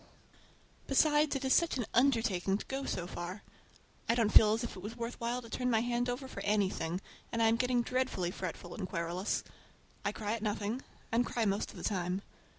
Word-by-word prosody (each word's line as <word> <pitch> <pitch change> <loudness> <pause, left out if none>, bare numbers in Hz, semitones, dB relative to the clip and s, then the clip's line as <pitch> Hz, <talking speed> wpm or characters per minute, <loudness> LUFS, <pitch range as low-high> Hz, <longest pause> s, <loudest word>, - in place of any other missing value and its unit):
Besides, 295 +1 +4
it 275 0 -2
is 265 - +4
such 340 -5 +3
an 240 - -1
undertaking 225 -7 +3
to - - -7
go 270 0 -3
so 175 - -2
far. 180 +3 -6 0.7
I 230 - +4
don't 225 -3 +2
feel 215 0 +8
as 225 +2 -1
if 235 - -4
it - - -8
was 220 +5 -6
worth 235 +1 -4
while 240 +2 -1
to - - -10
turn 250 +2 -1
my 225 -2 +3
hand 240 +1 0
over 255 +2 -3
for - - -7
anything, 190 -4 0 0.3
and 230 - -1
I'm 225 0 +5
getting 250 0 +2
dreadfully 250 -9 0
fretful 175 -1 -5
and 190 - -4
querulous. 170 +3 -1 0.6
I 205 - +1
cry 210 0 -3
at 230 - -3
nothing, 210 +3 -1 0.3
and 230 +2 +3
cry 235 -1 -1
most 200 0 0
of - - -11
the - - -7
time. 185 -1 -1
225 Hz, 205 wpm, -33 LUFS, 195-245 Hz, 0.7 s, feel